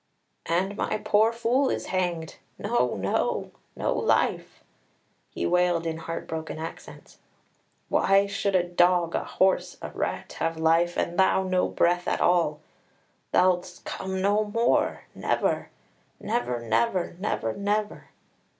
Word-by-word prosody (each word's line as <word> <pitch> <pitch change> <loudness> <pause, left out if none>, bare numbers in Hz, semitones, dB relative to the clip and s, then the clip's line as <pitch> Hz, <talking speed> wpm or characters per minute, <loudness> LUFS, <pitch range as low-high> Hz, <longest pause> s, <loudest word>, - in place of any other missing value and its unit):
"And 190 +4 0
my - - -1
poor 215 +1 +3
fool 235 +4 +1
is - - -2
hanged! 175 -3 -2 0.2
No, 205 - 0
no, 95 0 -1 0.2
no - - 0
life!" - - 0 0.7
he - - -4
wailed 175 - +2
in 160 -1 -2
heart 165 +1 -6
broken 160 0 -5
accents. 160 +1 -9 0.7
"Why 195 +1 +3
should 200 -1 -1
a 180 - +4
dog, 175 -1 +2
a - - 0
horse, 190 0 +1
a - - -7
rat, - - -4
have 165 0 -1
life, 165 +2 +2
and 175 +2 -1
thou 190 0 +4
no 185 -1 +1
breath 175 +1 +1
at - - 0
all? 165 -4 +2 0.7
Thou'lt 180 -1 +2
come 190 0 -4
no 205 +2 +3
more 230 +3 +1
never, - - -1 0.5
never, 210 - -1
never, 115 - 0
never, 115 - -1
never! 205 +1 -2
180 Hz, 130 wpm, -26 LUFS, 165-200 Hz, 0.7 s, a